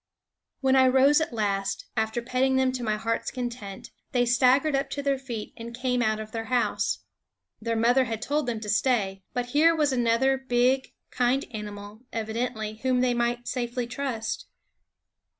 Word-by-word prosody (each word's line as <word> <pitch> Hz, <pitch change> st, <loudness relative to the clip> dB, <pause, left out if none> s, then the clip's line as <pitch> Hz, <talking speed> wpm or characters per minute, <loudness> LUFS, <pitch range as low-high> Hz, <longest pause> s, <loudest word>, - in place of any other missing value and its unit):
When 265 Hz, -1 st, +3 dB
I 260 Hz, -1 st, +6 dB
rose 270 Hz, +4 st, +5 dB
at 315 Hz, -, -1 dB
last, 200 Hz, -3 st, -1 dB
after 220 Hz, +1 st, -1 dB
petting 255 Hz, +2 st, +1 dB
them 260 Hz, 0 st, +3 dB
to 255 Hz, -1 st, -4 dB
my 215 Hz, -2 st, 0 dB
heart's 230 Hz, +1 st, -1 dB
content, 240 Hz, -6 st, -6 dB, 0.2 s
they 245 Hz, -1 st, +3 dB
staggered 255 Hz, +5 st, +4 dB
up 275 Hz, +1 st, 0 dB
to 285 Hz, -, -4 dB
their 275 Hz, -1 st, +1 dB
feet 235 Hz, -5 st, -6 dB
and 235 Hz, 0 st, -8 dB
came 250 Hz, -1 st, 0 dB
out 215 Hz, -2 st, +1 dB
of 215 Hz, 0 st, -7 dB
their 225 Hz, 0 st, -4 dB
house. 250 Hz, 0 st, 0 dB, 0.6 s
Their 230 Hz, +1 st, -1 dB
mother 245 Hz, +3 st, +4 dB
had 225 Hz, -2 st, -3 dB
told 290 Hz, +3 st, -1 dB
them 230 Hz, -2 st, -1 dB
to 215 Hz, -, -6 dB
stay; 205 Hz, -3 st, +1 dB
but 245 Hz, 0 st, -2 dB
here 320 Hz, +5 st, +4 dB
was 295 Hz, -3 st, +2 dB
another 250 Hz, +2 st, +2 dB
big, 260 Hz, 0 st, +1 dB, 0.2 s
kind 250 Hz, +3 st, +1 dB
animal, 210 Hz, 0 st, -7 dB
evidently, 220 Hz, -1 st, -3 dB
whom 255 Hz, +1 st, +1 dB
they 250 Hz, -1 st, +2 dB
might 240 Hz, 0 st, -1 dB
safely 245 Hz, -1 st, -2 dB
trust. 240 Hz, -3 st, -4 dB
245 Hz, 170 wpm, -26 LUFS, 225-260 Hz, 0.6 s, I